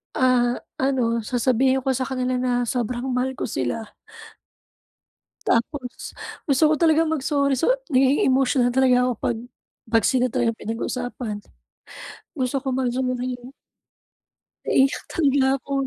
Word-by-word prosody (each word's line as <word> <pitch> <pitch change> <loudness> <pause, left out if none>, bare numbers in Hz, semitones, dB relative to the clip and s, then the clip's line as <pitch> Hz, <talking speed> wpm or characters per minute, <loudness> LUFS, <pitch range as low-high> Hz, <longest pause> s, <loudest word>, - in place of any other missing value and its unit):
Ah, 250 -1 +3 0.2
ano 240 -4 +1
sasabihin 255 +2 +1
ko 265 - +2
sa 260 - -3
kanila 255 -1 -1
na 245 -1 +1
sobrang 245 +1 -2
mahal 255 +1 -1
ko - - -2
sila. 205 - -3 1.5
Tapos, 250 +2 -1 0.4
gusto 280 +1 +3
ko 310 - +3
talaga 320 0 +3
mag 310 -4 -1
sorry, 280 -1 +1
so 330 - +2 0.2
nagiging 270 +2 +3
emotional 260 -1 +3
na 245 - -5
talaga 260 -1 +4
ako 250 - +1
pag 235 - 0 0.5
pag 225 -2 +3
sila 255 -1 +3
talaga 230 0 +1
'yung 225 - -14
pinag-uusapan. 230 0 -4 1.0
Gusto 260 0 -1
kong 265 -2 -1
mag-sorry. 250 0 -2 1.2
Naiiyak 270 0 +2
talaga 280 -5 +2
ako. 275 +1 -6
255 Hz, 130 wpm, -23 LUFS, 245-270 Hz, 1.5 s, talaga